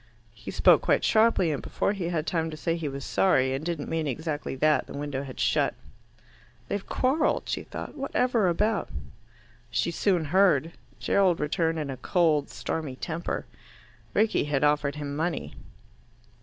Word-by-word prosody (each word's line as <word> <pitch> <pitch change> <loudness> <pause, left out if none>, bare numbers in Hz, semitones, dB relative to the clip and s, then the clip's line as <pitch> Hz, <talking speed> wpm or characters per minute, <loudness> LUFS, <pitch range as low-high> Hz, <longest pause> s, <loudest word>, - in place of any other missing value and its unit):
He - - -10
spoke - - +5
quite - - +2
sharply, 215 -7 +3
and 145 - -2
before 200 - -1
he 180 -4 -3
had 160 -3 -1
time 165 -2 -1
to 155 - -7
say 165 +2 -1
he 165 -3 -3
was 140 -1 -5
sorry 130 -9 +2
and 135 +3 -3
didn't 165 -3 -3
mean 160 -2 -1
exactly 150 0 -3
that, 150 +3 +2
the - - -7
window 145 -2 -3
had 135 -2 -8
shut. - - +2 0.9
"They've 200 -1 -2
quarrelled," 280 +5 +1
she - - -2
thought. - - -8
"Whatever 250 -6 +1
about?" 210 +5 +1 0.8
She 115 +9 0
soon 175 -1 +1
heard. 170 -6 +4 0.3
Gerald 190 -4 +2
returned 160 +2 0
in 150 -3 -3
a 130 - -6
cold 155 0 +2
stormy 150 -5 -4
temper. 165 +5 -4 0.7
Rickie 215 -5 +2
had 145 -1 0
offered 145 -1 +2
him 145 -1 -5
money. 155 - -2
160 Hz, 160 wpm, -27 LUFS, 145-185 Hz, 0.9 s, spoke